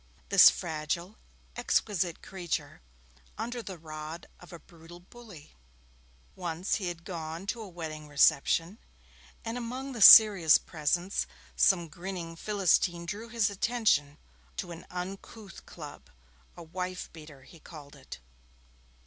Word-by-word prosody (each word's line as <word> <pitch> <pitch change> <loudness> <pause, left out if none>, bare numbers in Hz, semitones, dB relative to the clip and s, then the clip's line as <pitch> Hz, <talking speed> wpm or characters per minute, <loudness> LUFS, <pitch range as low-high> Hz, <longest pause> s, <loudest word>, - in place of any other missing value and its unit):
This - - +9
fragile, 160 - -4 0.4
exquisite 195 -7 -1
creature 180 - -5 0.6
under 240 0 -4
the 190 -5 -8
rod 155 +1 -8
of 180 - -15
a 170 - -9
brutal 170 +1 -16
bully! 190 -4 -15 0.8
Once 175 0 -2
he 195 -4 -4
had 170 -1 -7
gone 165 -1 -6
to 230 +3 -4
a 210 - -9
wedding 155 -3 -8
reception, 155 +6 +2 0.7
and 230 +2 -4
among 255 +3 -6
the 235 -4 -7
serious 200 -8 +9
presents 175 +4 -2 0.3
some 175 -4 +3
grinning 170 0 -7
Philistine 180 -2 +1
drew 210 +7 -6
his 225 -3 0
attention 200 -9 0 0.4
to 175 - -5
an 170 0 -10
uncouth 195 +2 -9
club - - -11 0.5
'a 170 - -9
wife 180 +2 -6
beater' 155 -4 -13
he 165 +5 -16
called 150 -2 -13
it. 135 -2 -11
175 Hz, 125 wpm, -29 LUFS, 160-200 Hz, 0.8 s, This